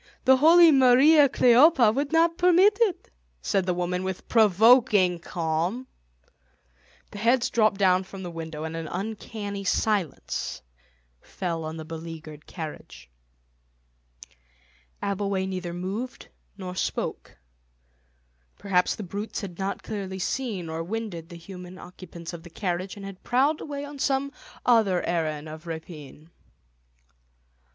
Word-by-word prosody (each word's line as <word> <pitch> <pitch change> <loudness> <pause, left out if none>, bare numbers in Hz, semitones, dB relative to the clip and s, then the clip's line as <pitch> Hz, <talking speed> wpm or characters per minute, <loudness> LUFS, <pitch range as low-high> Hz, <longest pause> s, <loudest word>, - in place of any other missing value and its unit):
The 265 0 +6
holy 330 +4 +7
Mariä 275 +3 +6
Kleophä 250 -1 +5
would 280 +3 -2
not 330 +1 +3
permit 365 +4 +5
it," 380 -6 0 0.3
said 190 - -1
the 180 - +2
woman 180 +1 -2
with 190 -1 -5
provoking 215 -3 +4
calm. 170 +8 -2 1.3
The 205 - -8
heads 235 +3 +2
dropped 215 -3 +2
down 185 -1 +3
from 190 0 -9
the 175 - -6
window 160 -2 -6
and 160 0 -5
an 165 -1 -5
uncanny 205 +1 -5
silence 195 - -2 0.6
fell 170 -3 -4
on 160 +1 -6
the 160 - -7
beleaguered 160 -1 -9
carriage. 105 - -9 1.9
Abbleway 200 -1 -1
neither 185 -2 -4
moved 195 +8 -5 0.3
nor 185 -2 -6
spoke. - - -4 1.2
Perhaps 180 -2 +1
the 215 - -7
brutes 200 +4 -5
had 185 -4 -8
not 195 +1 -3
clearly 195 -3 -5
seen 200 -3 -3
or 160 +1 -4
winded 185 -4 -5
the 170 - -10
human 180 +1 -10
occupants 175 -2 -10
of 170 - -8
the 175 - -13
carriage, 180 +1 -3
and 200 - -8
had 195 -1 -9
prowled 275 +5 +1
away 285 -1 -5
on 285 -1 -10
some 275 0 0 0.3
other 220 -7 +3
errand 155 -3 -2
of 155 +2 -10
rapine. 160 -1 -9
190 Hz, 130 wpm, -26 LUFS, 170-240 Hz, 1.9 s, holy